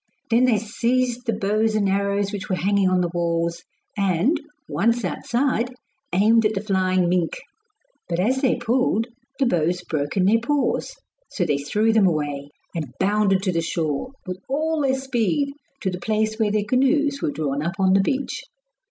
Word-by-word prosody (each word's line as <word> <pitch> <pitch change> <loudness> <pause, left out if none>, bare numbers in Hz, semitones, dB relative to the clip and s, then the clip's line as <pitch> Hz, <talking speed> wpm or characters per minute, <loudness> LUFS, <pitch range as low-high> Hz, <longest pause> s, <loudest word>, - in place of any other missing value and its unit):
Then 240 +3 +5
they 240 -4 +3
seized 240 +3 -1
the 230 - +2
bows 215 +2 +1
and 205 -2 +2
arrows 200 +1 0
which 205 -1 -5
were 185 - +1
hanging 195 0 +2
on 185 -1 +2
the 175 -1 -1
walls 170 0 -1 0.3
and, 195 - +2 0.3
once 230 0 +1
outside, 245 +5 -1 0.4
aimed 225 +4 +4
at 215 0 +1
the 195 - -1
flying 185 -3 +1
mink; 175 -1 0 0.7
but 170 0 -1
as 255 +8 +1
they 260 - +3
pulled 240 -2 +1 0.3
the 275 - +2
bows 180 -4 +1
broke 150 -1 -3
in 185 - +3
their 220 +4 +4
paws, 290 - 0 0.3
so 180 - -1
they 145 -3 +1
threw 210 +11 +1
them 215 -4 +5
away, 145 -4 -2 0.2
and 150 -7 -5
bounded 195 -1 +2
to 190 - +1
the 165 -1 0
shore, 165 - -2
with 185 -1 -5
all 310 +3 0
their 265 -1 +1
speed, 265 +2 0 0.3
to 190 -5 -1
the 180 - -5
place 220 +2 -1
where 220 -2 +2
their 210 0 0
canoes 280 +3 +2
were - - 0
drawn 145 -2 -2
up 170 +4 -2
on 190 -1 +3
the 195 - +5
beach. 270 +7 -2
205 Hz, 180 wpm, -23 LUFS, 180-240 Hz, 0.7 s, Then